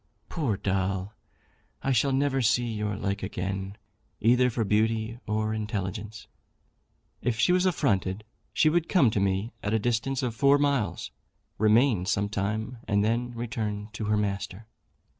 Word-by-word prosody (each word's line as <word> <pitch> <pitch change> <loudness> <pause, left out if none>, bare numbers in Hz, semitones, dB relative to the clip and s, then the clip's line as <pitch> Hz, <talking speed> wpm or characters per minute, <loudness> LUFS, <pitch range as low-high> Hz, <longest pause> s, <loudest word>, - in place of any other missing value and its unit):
Poor 135 - -1
Doll! 95 +1 -1 0.7
I 135 - +1
shall 135 +2 +3
never 135 0 +1
see 120 +1 +2
your 105 -3 -2
like 100 0 -2
again, 95 +1 -4 0.4
either 125 +3 +4
for 115 -1 -1
beauty 110 +2 0
or 110 0 0
intelligence. 105 -1 -4 1.0
If 120 -2 0
she 180 - +4
was 180 +1 +3
affronted 105 - 0 0.3
she - - +3
would 165 +1 +2
come 140 - +4
to 105 - 0
me, 100 +3 0
at 105 +2 0
a - - +4
distance 120 +4 -1
of 120 -3 -1
four 140 +5 +4
miles, 140 -7 0 0.5
remain 110 -2 +3
some 100 +2 +1
time, 110 +4 -3
and 100 -1 +2
then 120 +2 -1
return 110 -3 -3
to 105 +1 -4
her 105 0 +2
master. 100 0 -3
110 Hz, 150 wpm, -27 LUFS, 100-120 Hz, 1.0 s, either